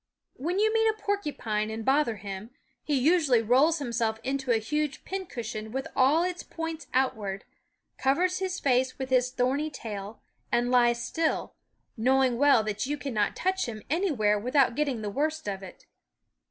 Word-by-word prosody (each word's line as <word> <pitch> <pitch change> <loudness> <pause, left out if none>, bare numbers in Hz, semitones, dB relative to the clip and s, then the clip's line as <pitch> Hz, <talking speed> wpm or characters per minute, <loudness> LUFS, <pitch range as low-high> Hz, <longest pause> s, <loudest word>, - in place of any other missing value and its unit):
When 340 +7 -3
you 435 +2 +3
meet 445 0 +3
a 435 - 0
porcupine 290 - -2
and 220 0 -5
bother 270 -4 +2
him, 200 +1 -7 0.3
he 295 - 0
usually 275 -4 +3
rolls 270 +9 +4
himself 235 -5 -1
into 270 -1 -1
a 230 - +4
huge 300 +6 -2
pincushion 235 - -5
with 265 +2 -3
all 280 +6 +4
its 360 -1 -2
points 325 -1 -6
outward, 210 -7 -1 0.5
covers 360 +8 +2
his 380 -1 -2
face 255 -1 +1
with 265 -1 -5
his 255 -1 +3
thorny 265 +4 0
tail, 215 -6 -7 0.3
and 240 +1 +1
lies 240 -1 +3
still, 320 +6 -1 0.4
knowing 255 +1 +2
well 280 -6 +5
that 215 +3 -2
you 295 +1 -2
cannot 230 -8 -1
touch 375 -2 0
him 215 -3 -6
anywhere 270 - +2
without 255 +3 +2
getting 270 -5 -1
the 205 - -3
worst 310 +3 -1
of 195 -1 -3
it. 190 -2 -12
260 Hz, 165 wpm, -28 LUFS, 225-305 Hz, 0.5 s, well